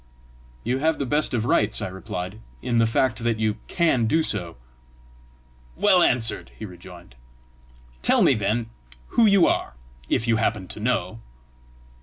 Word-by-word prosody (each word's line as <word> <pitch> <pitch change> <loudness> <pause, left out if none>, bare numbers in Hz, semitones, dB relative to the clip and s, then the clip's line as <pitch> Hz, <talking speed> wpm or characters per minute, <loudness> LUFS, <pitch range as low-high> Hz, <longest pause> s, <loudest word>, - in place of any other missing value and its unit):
"You 125 +3 -1
have 160 +2 +1
the 140 - -2
best 145 0 0
of 110 -1 -1
rights," 110 -3 +2
I 105 - -3
replied, 95 +1 -6 0.2
"in 120 -2 +1
the 115 - +4
fact 120 +1 +1
that 115 -1 0
you 110 0 -1
CAN 145 -10 +1
do 160 +7 +2
so!" 90 - -3 1.2
"Well 190 -3 +4
answered!" 120 -8 +1
he 110 - -7
rejoined. 90 - -13 0.9
"Tell - - +4
me, - - +5
then, 110 +3 -1 0.4
who 230 -2 +4
you 200 -3 +5
are - - -1 0.3
if 115 - 0
you 115 -1 +3
happen 105 -4 -1
to - - -6
know." 115 0 -1
115 Hz, 155 wpm, -24 LUFS, 105-130 Hz, 1.2 s, me